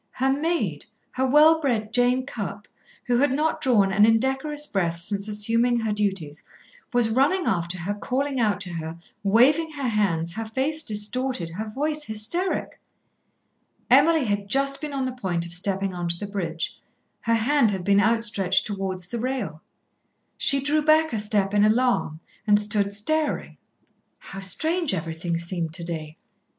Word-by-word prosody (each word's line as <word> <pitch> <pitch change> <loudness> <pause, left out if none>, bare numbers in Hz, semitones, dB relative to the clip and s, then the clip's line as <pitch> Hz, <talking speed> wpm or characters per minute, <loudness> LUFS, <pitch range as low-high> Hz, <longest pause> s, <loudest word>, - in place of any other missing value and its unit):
Her 265 +1 +1
maid, 275 - -2 0.2
her 260 +1 0
well 310 +4 +5
bred 225 -6 -1
Jane 250 +1 +2
Cupp, 205 -5 -6 0.4
who 245 -1 +1
had 285 0 +3
not 305 +4 0
drawn 210 -8 +3
an 205 +2 +4
indecorous 265 +7 +1
breath 175 - -1
since 200 +4 -3
assuming 230 +3 +1
her 220 -2 -1
duties, 190 -8 -2 0.5
was 240 -3 +2
running 290 +10 +2
after 175 0 0
her 180 +4 -3
calling 265 +6 -2
out 215 -3 +1
to 185 -3 -1
her, 165 0 -5 0.2
waving 270 +11 +3
her 280 -3 -3
hands, 175 -7 0
her 225 +3 -4
face 270 +8 -1
distorted, 210 - -1
her 215 +6 -5
voice 300 +5 -2
hysteric. 225 - -1 1.1
Emily 295 +2 +5
had 205 -2 0
been 200 - -14
just 275 +6 0
on 280 -3 -2
the 255 - -2
point 185 -9 -2
of 170 - -6
stepping 195 +1 0
on 175 -1 -3
to 170 - +2
the 205 - -5
bridge, 170 -5 -4 0.4
her 230 0 +1
hand 245 +2 +3
had 190 -3 -3
been 200 0 +4
outstretched 215 -4 +1
towards 190 -3 -4
the 235 +5 -4
rail. 230 -11 -3 0.7
She 275 -2 +3
drew 300 +3 +1
back 310 0 +3
a 220 - 0
step 205 -2 0
in 205 0 +4
alarm 215 -8 +1 0.3
and 205 0 +5
stood 205 -1 0
staring. 310 +9 -1 0.6
How 195 - -9
strange 315 - 0
everything 165 0 -3
seemed 170 -2 -3
to 175 - -5
day. 160 -2 -6
215 Hz, 160 wpm, -24 LUFS, 190-265 Hz, 1.1 s, well